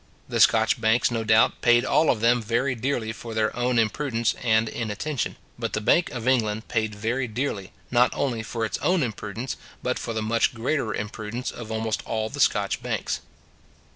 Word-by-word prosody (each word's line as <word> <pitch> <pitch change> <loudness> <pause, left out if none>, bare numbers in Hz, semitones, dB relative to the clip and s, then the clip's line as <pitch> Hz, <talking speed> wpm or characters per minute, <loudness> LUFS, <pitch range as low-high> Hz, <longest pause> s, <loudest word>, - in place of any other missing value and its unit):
The - - -2
Scotch - - +4
banks, 115 +2 +3
no 115 -1 -1
doubt, 110 0 +3
paid 120 +1 +4
all 160 - +3
of 110 - +2
them 120 +1 +4
very 120 +4 0
dearly 120 -2 -2
for 115 0 -8
their 110 -1 +1
own 125 0 +1
imprudence 115 +1 +1
and 110 -1 +3
inattention: 115 +6 -3 0.2
but - - -3
the - - 0
Bank 170 +11 +3
of 120 -1 -5
England 110 -4 +1
paid 110 -3 -1
very 120 +5 -1
dearly, 110 -4 -3 0.2
not 125 0 +5
only 125 -5 -1
for 115 0 -3
its 110 - -3
own 180 -4 +2
imprudence, 115 +1 -4 0.3
but 125 - -1
for 115 - -4
the 110 -1 -2
much 115 +2 +1
greater 120 0 -1
imprudence 110 +4 -4
of 115 -2 -8
almost 110 0 -1
all 110 -1 -1
the 145 - -8
Scotch 105 -6 +2
banks. - - -2
115 Hz, 185 wpm, -25 LUFS, 110-125 Hz, 0.3 s, not